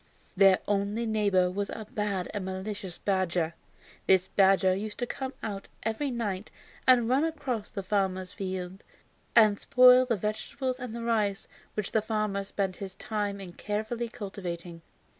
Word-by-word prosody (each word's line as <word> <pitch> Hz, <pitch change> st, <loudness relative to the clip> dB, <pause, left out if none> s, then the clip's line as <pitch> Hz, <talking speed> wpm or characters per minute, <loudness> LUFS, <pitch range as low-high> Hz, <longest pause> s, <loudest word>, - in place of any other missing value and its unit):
Their 195 Hz, -1 st, +6 dB
only 205 Hz, +3 st, 0 dB
neighbor 200 Hz, -5 st, +2 dB
was 200 Hz, +2 st, -2 dB
a 220 Hz, -, -6 dB
bad 210 Hz, -6 st, -1 dB
and 205 Hz, -3 st, -3 dB
malicious 190 Hz, -1 st, -5 dB
badger. 180 Hz, -4 st, 0 dB, 0.5 s
This 190 Hz, -1 st, +4 dB
badger 190 Hz, -1 st, +4 dB
used 210 Hz, +2 st, -5 dB
to 245 Hz, -, -1 dB
come 265 Hz, +2 st, -4 dB
out 200 Hz, -2 st, -4 dB, 0.2 s
every 225 Hz, +6 st, -1 dB
night 215 Hz, -5 st, -3 dB, 0.4 s
and 245 Hz, -3 st, +6 dB
run 260 Hz, +5 st, +3 dB
across 270 Hz, -9 st, -2 dB
to -, -, -24 dB
the 195 Hz, -, -3 dB
farmer's 185 Hz, -2 st, 0 dB
field 185 Hz, 0 st, -5 dB, 0.5 s
and 215 Hz, -3 st, +6 dB
spoil 250 Hz, 0 st, +7 dB
the 235 Hz, -, +2 dB
vegetables 250 Hz, +6 st, -3 dB
and 245 Hz, -3 st, -6 dB
the 235 Hz, -, -5 dB
rice 215 Hz, -3 st, 0 dB, 0.3 s
which 210 Hz, -3 st, -2 dB
the 220 Hz, -, +2 dB
farmer 215 Hz, -2 st, -1 dB
spent 195 Hz, -1 st, -2 dB
his 190 Hz, -1 st, -6 dB
time 205 Hz, -2 st, -3 dB
in 185 Hz, -3 st, -8 dB
carefully 220 Hz, +4 st, -3 dB
cultivating. 180 Hz, -6 st, -6 dB
205 Hz, 160 wpm, -29 LUFS, 190-225 Hz, 0.5 s, spoil